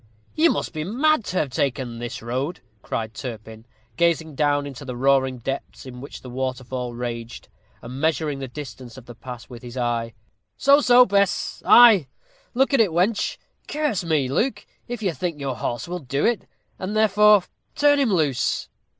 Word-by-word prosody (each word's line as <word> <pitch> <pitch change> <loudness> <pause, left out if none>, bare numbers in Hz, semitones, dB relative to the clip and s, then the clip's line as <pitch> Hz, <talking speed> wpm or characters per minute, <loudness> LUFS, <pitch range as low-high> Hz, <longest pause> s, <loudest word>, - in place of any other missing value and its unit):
"You 330 +2 +4
must - - -2
be 155 -1 -3
mad 260 - +2
to 185 - -3
have 145 -6 0
taken 125 -3 -2
this 120 -2 -6
road," 130 +9 -3 0.2
cried 110 -1 -4
Turpin, 110 -3 -8 0.3
gazing 165 -2 +1
down 145 0 +1
into 140 -1 -8
the 125 -2 -6
roaring 130 0 +2
depths 135 +4 -6
in 125 -1 -9
which 140 - -10
the 125 - -9
waterfall 125 -1 -4
raged, 120 -1 -6 0.3
and 130 +3 -7
measuring 155 -3 0
the 135 - -5
distance 130 -3 -9
of 130 - -12
the 120 - -10
pass 120 0 -9
with 120 -2 -11
his 120 0 -9
eye. 120 -2 -2 0.4
"So, 280 +1 +5
so, 250 -1 +7
Bess! 200 -2 0
Ay, 220 - +8 0.5
look 270 +3 +2
at 270 - +5
it, 210 - +3
wench. 185 +6 0 0.3
Curse 295 -11 -1
me, 155 -5 +1
Luke, 210 - -1 0.2
if 240 -2 -5
I 190 - +1
think 170 -2 -4
your 135 -3 -3
horse 120 +6 -3
will 180 +1 -4
do 140 -1 -2
it, 235 -2 0 0.3
and, 190 +3 -4
therefore, 210 -2 +5 0.3
turn 290 0 +4
him 265 -6 +2
loose." 145 -9 0
140 Hz, 175 wpm, -23 LUFS, 125-200 Hz, 0.5 s, Ay